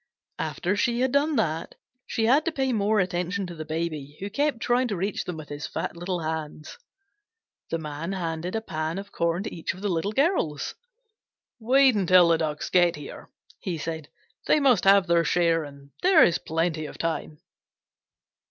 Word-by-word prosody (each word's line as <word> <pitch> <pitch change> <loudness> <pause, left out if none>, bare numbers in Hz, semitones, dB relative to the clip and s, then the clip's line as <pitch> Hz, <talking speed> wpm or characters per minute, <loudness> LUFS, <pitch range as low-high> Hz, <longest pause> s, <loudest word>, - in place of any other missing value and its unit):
After 185 +3 -1
she 240 +3 +1
had 260 0 +2
done 290 +3 +2
that, 165 - -1 0.3
she 225 - 0
had 275 +7 +4
to 335 - 0
pay 265 -4 0
more 210 0 +2
attention 180 +1 -1
to 175 - -7
the 155 -2 -7
Baby, 155 -3 -4
who 200 +1 -5
kept 285 0 0
trying 245 +1 +1
to 210 - -2
reach 195 +3 -2
them 180 -3 -5
with 155 -1 -9
his 145 0 -5
fat - - -4
little 175 +1 -3
hands. 155 - -5 0.9
The 165 - -1
Man 155 +3 -5
handed 170 0 -3
a 220 - -1
pan 160 -4 -3
of 200 +1 -7
corn 170 +2 0
to 220 - -5
each 165 - -3
of 185 - -12
the 205 - -1
Little 175 +3 -1
Girls. 265 - 0 0.9
"Wait 260 +3 +5
until 185 -4 +5
the 165 -1 +3
Ducks 150 -1 -3
get 175 -2 +4
here," 145 -1 -10 0.3
he 180 -4 -3
said. 160 -1 -5 0.4
"They - - +4
must 255 -10 +3
have 195 -1 +6
their 170 -1 +3
share 165 0 +2
and 140 -1 -12
there 365 -3 +6
is 170 - +3
plenty 160 -1 -1
of - - -10
time." 160 -2 -3
175 Hz, 185 wpm, -26 LUFS, 160-220 Hz, 0.9 s, have